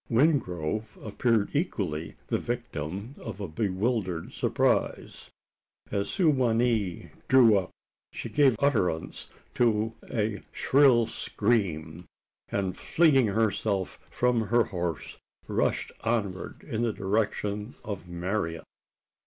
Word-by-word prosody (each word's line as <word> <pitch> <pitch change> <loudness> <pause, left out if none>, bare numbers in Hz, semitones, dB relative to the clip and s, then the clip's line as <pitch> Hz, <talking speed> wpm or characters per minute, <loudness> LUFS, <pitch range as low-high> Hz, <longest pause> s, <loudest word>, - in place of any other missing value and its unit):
Wingrove 110 - +1
appeared 110 +1 +1
equally 85 - -2
the - - -1
victim 105 - -4
of 105 -3 -6
a 100 - -3
bewildered 95 0 -1
surprise. - - 0 0.6
As 100 -1 -1
Su 185 -4 +2
wa 130 -5 +2
nee 115 -6 0 0.2
drew 125 -5 +7
up, 95 -2 0 0.4
she - - -6
gave 140 -4 +4
utterance 105 - 0 0.3
to 115 -2 +2 0.2
a 110 -3 -1
shrill 130 -4 +4
scream; 90 -8 -1 0.4
and 95 -2 -1
flinging 140 - +3
herself 100 -2 0
from 120 -3 +1
her 120 +2 +4
horse, 85 -5 -4 0.3
rushed - - 0
onward 105 -5 -2
in 110 - -3
the 115 -2 +1
direction 105 +2 -1
of 100 -5 -6
Marian. 85 -1 -2
105 Hz, 110 wpm, -28 LUFS, 95-120 Hz, 0.6 s, drew